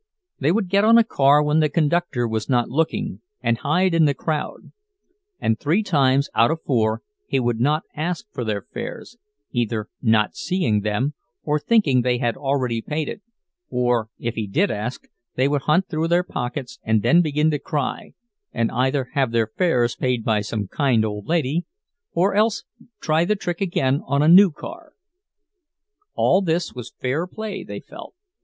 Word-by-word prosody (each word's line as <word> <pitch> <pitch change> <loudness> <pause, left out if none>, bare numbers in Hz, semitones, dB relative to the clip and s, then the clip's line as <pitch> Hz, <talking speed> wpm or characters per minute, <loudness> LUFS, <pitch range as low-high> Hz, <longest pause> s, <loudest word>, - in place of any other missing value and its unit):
They 145 +3 +2
would 200 0 0
get 200 +3 +2
on 225 +2 +6
a 235 - +6
car 145 -7 +4
when 150 +1 +2
the 155 -1 +3
conductor 155 -6 0
was 110 -1 -3
not 120 -2 +2
looking, 175 - -1 0.2
and 115 0 +1
hide 180 +5 +1
in 165 -1 +4
the 140 -2 +2
crowd; 155 0 -4 0.7
and 110 0 0
three 170 +9 +1
times 140 -7 +2
out 115 - +4
of 160 0 -3
four 110 -4 0 0.2
he - - +1
would 120 -2 0
not 150 +5 +1
ask 170 +6 -3
for 125 - -3
their 105 -3 -2
fares, 240 0 -8 0.3
either 115 -3 -2
not 110 -3 +2
seeing 120 - 0
them, 105 +8 -1 0.3
or 150 0 0
thinking 150 - +3
they 125 0 +1
had 120 -1 -1
already 130 -5 -1
paid; 150 - -4 0.5
or 120 -3 0
if 120 -1 -3
he 110 -2 -3
did 180 - +1
ask, 110 +5 -5 0.3
they 130 +2 +2
would 145 -1 0
hunt 175 +5 +3
through 160 +1 -1
their 175 +1 +2
pockets, 125 -6 -5
and 110 -2 +1
then 170 +1 +5
begin 155 -1 +1
to 150 - -1
cry, 150 0 -3 0.4
and 115 -1 -1
either 130 +1 0
have 135 -5 +1
their 115 -2 0
fares 125 -10 +1
paid 125 -3 -1
by 110 -2 +2
some 105 -1 -3
kind 120 -2 +1
old 105 -1 -5
lady, 165 0 0 0.5
or 190 +4 +1
else 215 +2 +2 0.4
try 155 +1 +2
the 210 +4 +1
trick 180 -3 -4
again 140 -7 +1
on 140 +2 +2
a - - +3
new 190 +4 +8
car. 320 - -10 1.2
All 190 - +3
this 170 -1 -1
was 125 -1 -8
fair 140 +8 -1
play, 215 +1 -6
they - - -7
felt. - - -12
145 Hz, 175 wpm, -22 LUFS, 120-170 Hz, 1.2 s, new